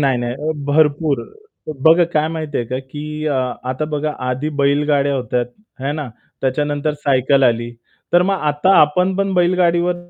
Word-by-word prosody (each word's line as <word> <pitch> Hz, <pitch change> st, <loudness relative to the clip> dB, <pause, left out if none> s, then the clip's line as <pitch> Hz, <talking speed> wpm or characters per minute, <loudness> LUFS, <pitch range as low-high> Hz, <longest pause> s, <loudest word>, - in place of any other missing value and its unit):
नाही, 135 Hz, -3 st, +2 dB
नाही. 130 Hz, +6 st, -3 dB
भरपूर 150 Hz, 0 st, +2 dB, 0.6 s
बघा 165 Hz, +2 st, +6 dB
काय 155 Hz, 0 st, +1 dB
माहिती 155 Hz, -3 st, -4 dB
आहे 120 Hz, -, -2 dB
का, 130 Hz, +2 st, -3 dB
की 150 Hz, +3 st, -6 dB
अ, 145 Hz, -, 0 dB, 0.4 s
आता 130 Hz, +4 st, -2 dB
बघा 150 Hz, +1 st, -1 dB, 0.2 s
आधी 130 Hz, +4 st, -2 dB
बैलगाड्या 140 Hz, 0 st, +2 dB
होत्या, 125 Hz, -1 st, -1 dB, 0.4 s
हे 140 Hz, -, 0 dB
ना? 150 Hz, -3 st, -4 dB, 0.3 s
त्याच्यानंतर 145 Hz, +2 st, -1 dB
सायकल 135 Hz, 0 st, +3 dB
आली 120 Hz, -1 st, +1 dB, 0.4 s
तर 175 Hz, -, +5 dB
मग 195 Hz, +2 st, +1 dB
आता 150 Hz, +6 st, +1 dB
आपण 180 Hz, +5 st, +2 dB
पण 195 Hz, -1 st, 0 dB
बैलगाडीवर 175 Hz, 0 st, +2 dB
150 Hz, 155 wpm, -18 LUFS, 135-160 Hz, 0.6 s, बघा